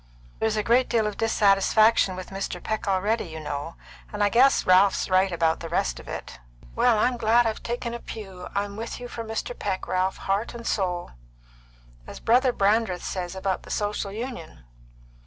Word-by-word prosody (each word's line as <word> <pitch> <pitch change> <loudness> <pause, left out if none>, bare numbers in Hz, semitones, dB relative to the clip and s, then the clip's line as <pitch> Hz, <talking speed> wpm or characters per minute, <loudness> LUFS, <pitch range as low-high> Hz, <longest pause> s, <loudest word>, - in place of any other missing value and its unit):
"There's 220 -1 +1
a 210 - +1
great 240 +3 +3
deal 225 -2 +2
of 210 -1 -2
dissatisfaction 215 -1 +4
with 185 +1 -8
Mr. 195 0 -4
Peck 220 0 -3
already, 200 +4 +1
you 160 -2 -8
know, 150 +1 -5 0.4
and 210 0 -1
I 205 - +4
guess 260 +5 +4
Ralph's 190 +1 +4
right 185 +1 +4
about 165 -1 +1
the 165 - -7
rest 60 - -1
of - - -13
it." - - -7 0.4
"Well, 240 -3 +4
I'm 245 +3 +2
glad 235 +1 +3
I've 220 -1 -2
taken 235 0 -4
a 235 - -5
pew. 195 -6 -8
I'm 200 0 -2
with 230 +3 -5
you 245 - -7
for 235 -1 -6
Mr. 225 +2 -4
Peck, 190 -2 -3
Ralph, 185 +1 0
heart 200 +5 -2
and 235 0 -8
soul." 180 -5 -1 1.0
"As - - -9
Brother 250 +3 +3
Brandreth 205 -4 +1
says 180 -1 -4
about 190 0 -2
the - - -14
Social 205 -1 -2
Union. 210 - -7
205 Hz, 185 wpm, -25 LUFS, 185-230 Hz, 1.0 s, dissatisfaction